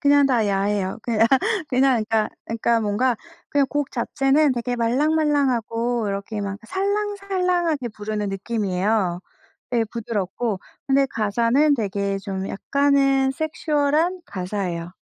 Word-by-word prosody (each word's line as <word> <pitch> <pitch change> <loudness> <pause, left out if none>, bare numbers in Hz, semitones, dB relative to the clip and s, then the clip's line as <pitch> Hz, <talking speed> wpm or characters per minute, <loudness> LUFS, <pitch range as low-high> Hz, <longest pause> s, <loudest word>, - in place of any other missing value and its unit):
그냥 285 -1 +5
다 240 -5 +2
야해요. 200 0 0
그냥, 225 -1 +3 0.4
그냥 255 -3 +3
그러니까, 220 -1 +2 0.2
그러니까 230 +1 +1
뭔가 225 +4 +1 0.3
그냥 285 -1 +2
곡 290 -1 -2
자체는 270 +4 +2
되게 245 0 -2
말랑말랑하고 245 -3 +1
이렇게 200 +2 -4
막 200 0 -4
살랑살랑하게 380 - 0
부르는 210 -1 -4
느낌이에요 195 -2 -1 0.5
예 230 -2 +2
부드럽고. 215 -2 -3 0.3
근데 275 0 +3
가사는 235 +7 +2
되게 200 -4 -1
좀 195 0 -4
약간은 275 +2 +2
섹슈얼한 310 +3 0
가사예요. 180 -3 -4
235 Hz, 305 characters per minute, -23 LUFS, 205-285 Hz, 0.5 s, 그냥